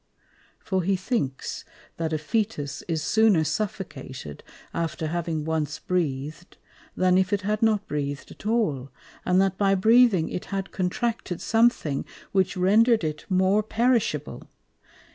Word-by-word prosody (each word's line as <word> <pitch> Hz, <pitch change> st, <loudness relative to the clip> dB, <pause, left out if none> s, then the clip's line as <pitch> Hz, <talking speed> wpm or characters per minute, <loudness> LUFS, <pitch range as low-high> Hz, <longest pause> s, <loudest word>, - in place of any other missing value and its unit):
For 190 Hz, -2 st, -1 dB
he 190 Hz, +3 st, +1 dB
thinks, 185 Hz, -, -3 dB, 0.3 s
that 165 Hz, -1 st, -2 dB
a -, -, +1 dB
Fœtus 155 Hz, -3 st, -2 dB
is 160 Hz, -3 st, -1 dB
sooner 220 Hz, -6 st, +4 dB
suffocated 150 Hz, -, -5 dB, 0.3 s
after 165 Hz, -1 st, -2 dB
having 160 Hz, -1 st, -2 dB
once 155 Hz, -2 st, -1 dB
breath'd, 155 Hz, -1 st, -3 dB, 0.4 s
than 185 Hz, 0 st, +4 dB
if 185 Hz, -1 st, 0 dB
it 205 Hz, -1 st, +1 dB
had 210 Hz, +2 st, -1 dB
not 215 Hz, -2 st, +2 dB
breath'd 145 Hz, -1 st, -4 dB
at 210 Hz, -, -9 dB
all, 155 Hz, -, 0 dB, 0.4 s
and 180 Hz, +1 st, +3 dB
that 190 Hz, -1 st, +1 dB
by 195 Hz, -1 st, +3 dB
breathing 220 Hz, -3 st, +5 dB
it 180 Hz, -, -5 dB
had 195 Hz, -1 st, -4 dB
contracted 205 Hz, +1 st, -2 dB
something 225 Hz, -, +2 dB, 0.3 s
which 190 Hz, 0 st, +1 dB
render'd 220 Hz, +4 st, +4 dB
it 155 Hz, -1 st, -3 dB
more 190 Hz, +2 st, +3 dB
perishable. 230 Hz, +2 st, 0 dB
185 Hz, 135 wpm, -25 LUFS, 155-215 Hz, 0.4 s, breathing